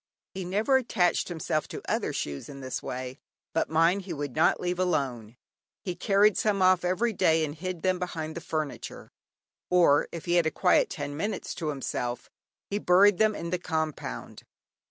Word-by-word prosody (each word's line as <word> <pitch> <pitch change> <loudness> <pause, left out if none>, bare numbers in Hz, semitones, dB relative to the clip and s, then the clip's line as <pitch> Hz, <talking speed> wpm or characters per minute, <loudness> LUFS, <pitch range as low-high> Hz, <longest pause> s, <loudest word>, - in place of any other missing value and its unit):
He 190 -1 -5
never 210 +9 +2
attached 190 -8 +1
himself 160 -3 -2
to - - -7
other - - 0
shoes 70 -1 -4
in 140 -1 -9
this 130 -1 -4
way, 130 +1 -6 0.3
but 165 - 0
mine 165 +4 +3
he 185 -3 -6
would 145 -3 -5
not 160 - +3
leave 180 0 -2
alone. 130 -10 -1 0.5
He 180 - -2
carried 205 +2 +3
some 210 -2 +1
off 185 -1 +4
every 205 +6 +1
day 160 -4 +3
and 145 - -5
hid 175 +1 -5
them 185 -1 +1
behind 160 -3 -4
the 170 - -5
furniture, 155 -3 -5 0.6
or 175 -5 +4
if 170 - -7
he 175 0 +2
had 170 -2 +3
a - - +3
quiet - - +3
ten 145 - -5
minutes 205 +8 -3
to 160 - -5
himself, 125 -4 -3 0.4
he 205 - 0
buried 195 +1 +5
them 215 -1 +3
in 170 0 -5
the 180 - 0
compound. 155 - -4
170 Hz, 180 wpm, -28 LUFS, 150-185 Hz, 0.6 s, buried